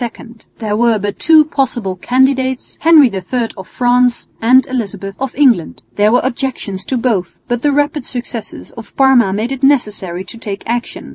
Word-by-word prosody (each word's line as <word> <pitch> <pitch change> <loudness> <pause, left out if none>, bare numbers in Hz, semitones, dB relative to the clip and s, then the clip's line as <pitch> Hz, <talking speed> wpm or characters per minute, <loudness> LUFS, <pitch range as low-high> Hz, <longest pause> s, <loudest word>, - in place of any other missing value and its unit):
There 215 -2 -2
were 230 0 +2
but 205 0 -4
two 310 -1 +5
possible 240 -10 -2
candidates, 260 +4 0
Henry 315 -3 +6
III 225 +5 -2
of 190 -2 -10
France 245 0 +1
and 255 +3 +5
Elizabeth 200 -6 -4
of 270 -1 -4
England. 250 - +2
There 210 +1 +3
were 245 - +3
objections 240 -7 -3
to 260 - -1
both, 220 -8 -1
but 240 -1 -2
the 290 - +2
rapid 290 0 0
successes 240 -3 -6
of 230 -2 -12
Parma 265 -7 +4
made 215 +6 -2
it 270 -1 -4
necessary 210 -10 0
to 210 +5 -11
take 205 -3 -6
action. 240 +1 -4
245 Hz, 165 wpm, -15 LUFS, 210-265 Hz, -, Henry